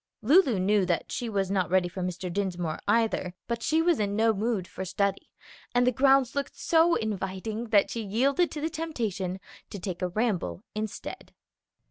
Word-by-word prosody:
Lulu 275 Hz, -, +5 dB
knew 200 Hz, +2 st, +3 dB
that 170 Hz, -2 st, -1 dB
she 240 Hz, -, -3 dB
was 195 Hz, -3 st, -1 dB
not 185 Hz, -5 st, +1 dB
ready 185 Hz, 0 st, +3 dB
for 180 Hz, +2 st, -6 dB
Mr. 180 Hz, 0 st, -4 dB
Dinsmore 180 Hz, -5 st, -2 dB
either, 210 Hz, -4 st, +1 dB
but 235 Hz, -1 st, -2 dB
she 320 Hz, +6 st, +2 dB
was 340 Hz, -5 st, +3 dB
in 205 Hz, -1 st, 0 dB
no 225 Hz, +1 st, +3 dB
mood 210 Hz, -3 st, -1 dB
for 190 Hz, -, -6 dB
study, 195 Hz, +1 st, -1 dB, 0.5 s
and 245 Hz, 0 st, +4 dB
the 250 Hz, -, +4 dB
grounds 265 Hz, 0 st, +4 dB
looked 280 Hz, 0 st, -3 dB
so 335 Hz, +1 st, +3 dB
inviting 210 Hz, +2 st, -3 dB
that 205 Hz, -3 st, +3 dB
she 230 Hz, -, -3 dB
yielded 270 Hz, -, +1 dB
to 300 Hz, -, -6 dB
the 320 Hz, -, 0 dB
temptation 220 Hz, -, -3 dB, 0.3 s
to -, -, -6 dB
take 185 Hz, -1 st, -5 dB
a 180 Hz, -, +1 dB
ramble 210 Hz, -1 st, -1 dB
instead. 215 Hz, -1 st, -6 dB
210 Hz, 180 wpm, -28 LUFS, 190-245 Hz, 0.5 s, Lulu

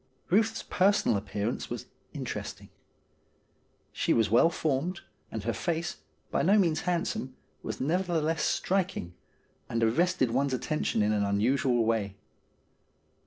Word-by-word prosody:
Euth's 220 Hz, +3 st, +2 dB
personal 200 Hz, -, +2 dB
appearance 105 Hz, +2 st, -3 dB
was -, -, -5 dB, 0.3 s
interesting. -, -, -6 dB, 1.2 s
She -, -, +1 dB
was 110 Hz, -3 st, +2 dB
well 120 Hz, +8 st, +6 dB
formed, 160 Hz, +2 st, -1 dB, 0.3 s
and -, -, -4 dB
her -, -, -1 dB
face, 170 Hz, -, -2 dB, 0.3 s
by -, -, +1 dB
no 200 Hz, +5 st, +4 dB
means 170 Hz, -6 st, +2 dB
handsome, 150 Hz, -7 st, -2 dB, 0.3 s
was -, -, -5 dB
neverthe 170 Hz, +2 st, 0 dB
less 160 Hz, 0 st, 0 dB
striking, 185 Hz, -, 0 dB, 0.6 s
and 115 Hz, 0 st, 0 dB
arrested 135 Hz, +2 st, +2 dB
one's 135 Hz, +2 st, +1 dB
attention 130 Hz, -5 st, 0 dB
in 105 Hz, -, +2 dB
an 105 Hz, -1 st, +1 dB
unusual 115 Hz, +4 st, +2 dB
way. 105 Hz, -4 st, 0 dB
140 Hz, 125 wpm, -29 LUFS, 115-175 Hz, 1.2 s, well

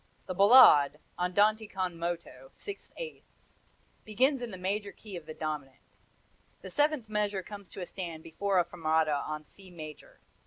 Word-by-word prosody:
The 185 Hz, -, -4 dB
Ballade 195 Hz, -, +8 dB, 0.2 s
andante 210 Hz, +5 st, +2 dB
con 185 Hz, -3 st, -3 dB
moto, 165 Hz, -6 st, -5 dB
six 405 Hz, -1 st, -9 dB
eighths -, -, -10 dB, 0.5 s
begins 255 Hz, +5 st, +2 dB
in 240 Hz, -, -4 dB
the 190 Hz, -, -7 dB
major 200 Hz, +2 st, -2 dB
key 210 Hz, -4 st, -11 dB
of 165 Hz, -3 st, -8 dB
the 155 Hz, -, -6 dB
dominant; 150 Hz, -4 st, -4 dB, 0.9 s
the -, -, -8 dB
seventh 295 Hz, -5 st, +2 dB
measure 210 Hz, -2 st, -1 dB
comes 200 Hz, 0 st, -10 dB
to -, -, -8 dB
a -, -, -3 dB
stand 170 Hz, -4 st, -7 dB
before 195 Hz, +4 st, -1 dB
a 175 Hz, -, +4 dB
fermata 160 Hz, -3 st, +1 dB
on 155 Hz, 0 st, -4 dB
C 190 Hz, +4 st, -16 dB
major. 155 Hz, -4 st, -11 dB
185 Hz, 160 wpm, -30 LUFS, 160-210 Hz, 0.9 s, Ballade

